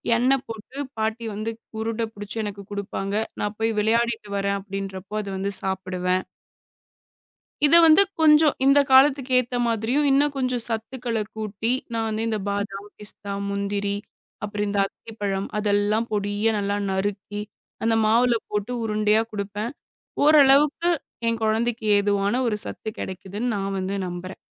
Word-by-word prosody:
எண்ணெ 255 +3 +4
போட்டு 225 +4 -9 0.2
பாட்டி 220 +1 -2
வந்து 215 +2 -3 0.3
உருண்ட 225 +1 -2
புடிச்சு 205 +1 -8
எனக்கு 200 -1 -5
குடுப்பாங்க. 200 0 -3 0.3
நான் 210 0 -2
போய் 225 0 +1
விளையாடிட்டு 225 -1 +1
வரேன் 200 0 0
அப்படின்றபோ 195 0 -6
அது 200 - -7
வந்து 195 +1 -2
சாப்பிடுவேன். 185 -1 -1 1.4
இத 295 - +6
வந்து 320 +4 +8 0.2
கொஞ்சம் 305 -1 +6
இந்த 275 +1 +6
காலத்துக்கு 265 0 +5
ஏத்த 250 0 -3
மாதிரியும், 230 +6 +1
இன்னும் 285 +1 +3
கொஞ்சம் 255 -2 0
சத்துக்கள 230 +1 -3 0.2
கூட்டி 220 +1 -2 0.2
நானே 225 -1 -1
இந்த 220 -1 0
பாதாம், 200 0 -4
பிஸ்தா, 205 -1 -5 0.2
முந்திரி, 200 0 -1 0.5
அப்புறம் 205 0 -2
இந்த 200 0 0
அத்திப்பழம் 200 -2 -4
அதெல்லாம் 210 +2 +1
பொடியா 205 +2 +1
நல்லா 200 0 -1
நறுக்கி 200 +1 -3 0.4
அந்த 225 0 +3
மாவுல 235 +2 +4 0.2
போட்டு 210 +3 -2
உருண்டையா 215 0 +2
கொடுப்பேன். 205 +2 -3 0.5
ஓரளவுக்கு 295 +2 +5 0.4
என் 230 -1 -1
கொழந்தைக்கு 225 +1 0
ஏதுவான 200 0 +1
ஒரு 215 -3 +1
சத்து - - -6
கிடைக்குதுன்னு 195 +6 -4
நான் 195 0 -2
வந்து 190 +1 -2
நம்புறேன். 180 +1 -7
210 Hz, 130 wpm, -24 LUFS, 200-235 Hz, 1.4 s, வந்து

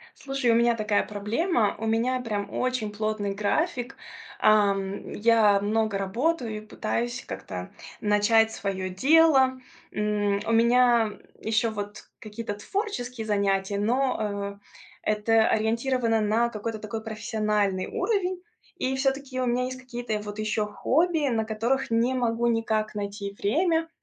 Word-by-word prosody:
Слушай, 270 -3 0
у - - +4
меня 235 0 +3
такая 210 -2 +1
проблема, 215 - 0
у 225 - -4
меня 235 +3 +1
прям 205 -4 -3
очень 255 -4 -1
плотный 210 -1 -2
график. 245 - -1 0.4
Ам, 200 -2 +2
я 215 -2 +4
много 215 0 0
работаю 230 +4 -1
и - - -7
пытаюсь 235 +3 -3
как-то 90 -1 -7 0.3
начать 210 +2 +3
своё 190 -3 -3
дело. 265 - +4 0.3
М, 205 -1 0
у - - -1
меня 235 -1 +4 0.3
еще 220 +1 +1
вот 205 -1 -6 0.2
какие-то 215 0 -6
творческие 250 - -4
занятия, 200 -1 +1
но, 255 +5 +1 0.4
э, - - -22 0.5
это 220 +1 +3
ориентировано 230 +1 +1
на 220 +3 +2
какой-то 220 0 -5
такой 220 +1 -5
профессиональный 210 -3 -1
уровень, 370 -2 -1 0.4
и 265 +1 -1
всё-таки 270 -1 -1
у - - +1
меня 245 +1 +1
есть 255 0 -5
какие-то 245 -4 -4
вот 210 0 -7
ещё 215 0 0
хобби, 310 - +1
на 225 -2 0
которых 230 +4 -1
не 230 +3 +2
могу 240 -2 0
никак 220 -2 0
найти 200 -1 -5
время. 325 - +2
225 Hz, 135 wpm, -26 LUFS, 210-250 Hz, 0.5 s, у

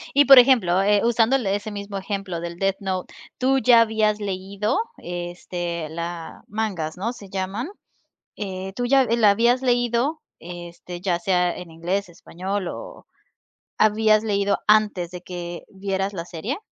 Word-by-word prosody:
Y, 285 - +6
por 275 -2 +10
ejemplo, 210 -8 +4
eh, 205 +1 +3
usando 235 +2 +3
el 255 -6 0
ese 205 +2 -1
mismo 200 0 -5
ejemplo 195 -3 -4
del 170 0 -6
Death 195 +1 0
Note, 190 -2 -4 0.2
¿tú 265 +1 +2
ya 240 -2 +6
habías 215 -1 +1
leído, 200 - -2 0.2
este, 175 -2 -5
la 170 0 -6
mangas?, 195 -7 -3
¿no?, 225 +6 -2
¿se 200 -5 -12
llaman?, 195 - -3 0.7
eh, 190 -1 -5
¿tú 245 - -1
ya 270 +2 +5
la 230 -2 +4
habías 240 +5 +3
leído, 245 +4 +1 0.2
este, 175 0 -9
ya 180 -3 0
sea 180 -1 +1
en 180 -2 -9
inglés, 180 +4 -2
español 185 +3 -5
o - - -9 0.7
habías 215 0 +4
leído 200 -2 +1
antes 210 -5 +3
de 180 -1 -8
que 175 -1 -7
vieras 195 0 -3
la 170 -3 -5
serie? 190 - -4
195 Hz, 155 wpm, -23 LUFS, 175-220 Hz, 0.7 s, por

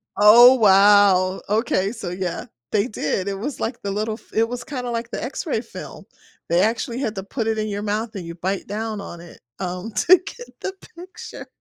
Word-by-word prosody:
Oh, 235 +5 +8
wow, 195 -3 +5
okay, 210 -2 +1
so, 210 - -6
yeah, 180 -1 -4 0.3
they 210 +2 +1
did, 185 -1 -2
it 200 - -1
was, 255 +6 -5
like, 235 +1 -3
the 200 - -3
little 215 +2 -2
f - - -20
it 225 +1 +2
was 245 0 -6
kinda, 250 -4 -5
like, 235 0 -3
the - - -4
X-ray 265 -1 -3
film. - - -10 0.4
They 170 +2 +3
actually 230 +3 -1
had 220 -6 -2
to 195 - -5
put 225 +2 -4
it 220 0 0
in 215 0 -1
your 205 0 -4
mouth 215 +1 -3
and 180 -3 -6
you 170 0 -7
bite 190 +2 -3
down 215 0 -4
on 170 -3 -9
it, 170 - -14 0.2
um, 180 +4 -4
to 340 - +5
get 395 +7 -11
the 380 - -4 0.2
picture. 360 +2 -10
215 Hz, 205 wpm, -22 LUFS, 195-235 Hz, 0.4 s, Oh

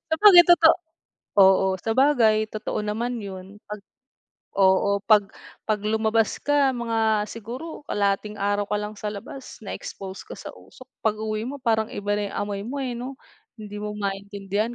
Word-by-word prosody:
Actually, 355 +1 +8
totoo 340 -2 +7 0.6
oo, 190 -1 +4
sabagay 225 -3 +3
totoo 215 0 -4
naman 235 +4 -2
yun 195 -2 -8
'pag 210 -1 -7 0.8
oo, 195 +1 +3
'pag 205 -2 +4 0.3
'pag 215 -2 0
lumabas 220 +1 +1
ka 290 -2 +3
mga 225 -2 +1
siguro 245 +10 -7
kalahating 205 +1 -1
araw 205 0 0
ka 210 - 0
lang 210 0 -5
sa 210 - -3
labas 235 +6 -9
na-expose 195 -1 -7
ka - - -7
sa - - -8
usok, - - -16 0.2
pag-uwi 215 0 -1
mo 280 - -5
parang 220 -2 +1
iba 205 0 -2
na 205 -1 -2
yung - - -8
amoy 205 -1 -3
mo 270 +4 -5
eh, 250 - -3
'no? 255 +3 -6 0.4
Hindi 210 -1 -8
mo 210 0 -4
maintindihan 200 +2 -3
215 Hz, 155 wpm, -24 LUFS, 200-230 Hz, 0.8 s, Actually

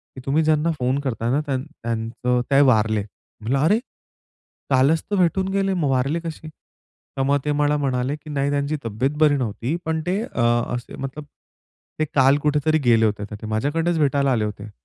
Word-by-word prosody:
की 130 - -8
"तुम्ही 150 +4 +2
ज्यांना 155 +1 +2
फोन 130 +2 +1
करताय 120 -4 -2
ना 140 - +2
त्यां 135 -3 -1
त्यांचं 120 -2 -2
ते 140 +1 +6
वारले." 110 -5 +3 0.4
म्हटलं 120 +6 -1
"अरे! 165 +10 +3 0.9
कालच 140 +4 +3
तर - - +2
भेटून 185 +1 +2
गेले. 195 -1 +1
मग 160 -6 0
वारले 135 +5 +1
कसे?" 165 -1 -7 0.7
तर - - 0
मग 140 +1 +2
ते 150 - +1
मला 145 0 +2
म्हणाले 135 -1 -1
की 155 +1 -13
"नाही. 140 -1 0
त्यांची 145 +1 -1
तब्येत 115 +6 -1
बरी 150 -2 +4
नव्हती. 120 +4 -2
पण 160 0 -1
ते 190 +4 0
अ, 130 - -4 0.3
असे 120 - -7
मतलब 135 +2 -6 0.7
ते 155 - +2
काल 135 +1 +5
कुठेतरी 150 +1 +2
गेले 115 -1 +5
होते" 105 -1 -1
ते 105 - -9
माझ्याकडेच 155 +9 0
भेटायला 140 -1 +2
आले 110 -3 +1
होते. 105 0 -7
140 Hz, 180 wpm, -22 LUFS, 125-155 Hz, 0.9 s, ते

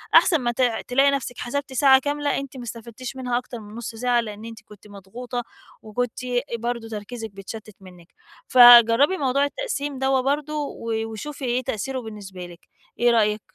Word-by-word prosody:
أحسَن 340 - +6
ما 240 - 0
ت 240 - -3 0.3
تلاقي 270 +3 +4
نَفسِك 250 -3 -3
حَسَبتِ 265 +2 -4
ساعة 265 0 +6
كاملة 290 +1 -1
أنتِ 275 -1 -6
ما 245 - -7
استفادتيش 235 +2 -8
مَنها 250 -2 -1
أكتَر 250 -1 -6
من 210 0 -12
نُصّ 230 -1 -6
ساعة 245 +1 +1
لأن 215 0 -8
أنتِ 225 -1 -9
كُنتِ 210 0 -16
مضغوطة 230 +5 -7 0.4
وكُنتِ 235 +3 -3 0.4
برضه 235 -1 -4
تركيزِك 225 +1 -7
بَيتشَتَّت 205 +2 -10
منِّك، 180 -3 -15 0.4
فَجَرَّبي 245 +6 +8
موضوع 275 0 +1
التقسيم 290 - -4
دوّة 265 -1 +2
برضه 290 +3 -1
و 285 -5 -5 0.2
وشوفي 260 +6 -7
إيه 250 +1 0
تأثيرُه 260 +2 -3
بالنسبة 200 -5 -9
لِك، 175 -1 -14 0.3
إيه 240 0 +4
رأيِك؟ 210 -2 +2
240 Hz, 170 wpm, -23 LUFS, 220-270 Hz, 0.4 s, فَجَرَّبي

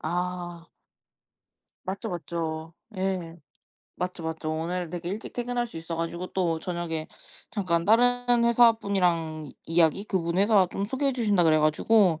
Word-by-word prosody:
아. 175 0 -4 1.2
맞죠, 190 +1 -4
맞죠. 165 -2 -4 0.2
예. 185 -3 -2 0.6
맞죠, 180 -1 -4
맞죠. 160 -1 -3
오늘 170 +3 -2
되게 175 +1 -5
일찍 210 +3 -5
퇴근할 245 0 -1
수 230 - -11
있어 165 +1 -5
가지고 170 +2 -3
또 170 -4 0
저녁에 165 -2 -3 0.4
잠깐 180 -7 0
다른 245 +2 +4
회사 235 0 +6
분이랑 175 -7 0
이 135 - -12
이야기 165 +3 +3
그분 175 -4 -1
회사 200 -1 +5
좀 195 - -2
소개해 270 +4 0
주신다 210 -8 +2
그래 155 -1 +5
가지고 165 +3 +3
180 Hz, 285 characters per minute, -27 LUFS, 165-205 Hz, 1.2 s, 회사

